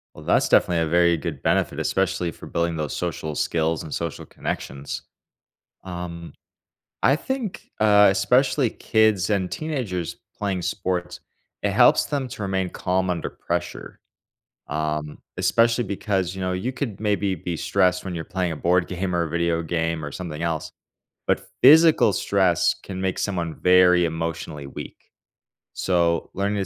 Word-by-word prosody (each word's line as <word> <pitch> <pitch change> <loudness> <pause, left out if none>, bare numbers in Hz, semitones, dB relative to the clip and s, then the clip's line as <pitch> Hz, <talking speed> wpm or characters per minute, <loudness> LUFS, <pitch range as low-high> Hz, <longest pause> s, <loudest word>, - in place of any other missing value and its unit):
Well, - - -12
that's - - +3
definitely 85 -2 +4
a 80 - -1
very 85 0 +4
good 75 - -5
benefit, - - +1
especially 85 -2 0
for - - -12
building 85 0 -1
those 75 -2 -3
social 80 -3 -3
skills 80 +1 0
and 80 - -7
social 85 -1 -4
connections, 70 +2 -5 0.8
um, 85 -2 -7 0.7
I 135 - +5
think, 250 - -5
uh, 105 -1 +6
especially 125 +6 +2
kids 110 -5 +2
and 95 -3 0
teenagers 125 - -3 0.2
playing 95 -3 -2
sports, 90 0 -3 0.4
it 105 - +1
helps 120 +8 +5
them 140 -3 -2
to 120 - -9
remain 95 -2 -1
calm 95 0 -1
under 85 -2 -2
pressure, - - -5 0.7
um, 75 0 -3 0.2
especially 115 +6 +3
because, 95 -2 -2
you 95 - -6
know, 90 0 -1
you 100 +8 -2
could 120 -7 -4
maybe 100 -2 0
be 85 +2 -4
stressed 90 +2 +1
when 90 -2 -4
you're 80 - -4
playing 95 -3 -2
a - - -5
board 90 +3 +2
game 90 0 -3
or 85 - +2
a 80 - -2
video 85 0 0
game 80 -1 -2
or 75 - -5
something 85 -2 -6
else, 80 -2 -2 0.5
but - - 0 0.2
physical 155 -4 +7
stress 95 -4 +2
can 95 -2 -7
make 95 -1 -1
someone 85 -5 -2
very 90 -1 +5
emotionally 80 -3 -4
weak, - - -8 0.8
so 85 -2 +1
learning 100 +2 -1
to 95 - -1
90 Hz, 155 wpm, -23 LUFS, 85-100 Hz, 0.8 s, physical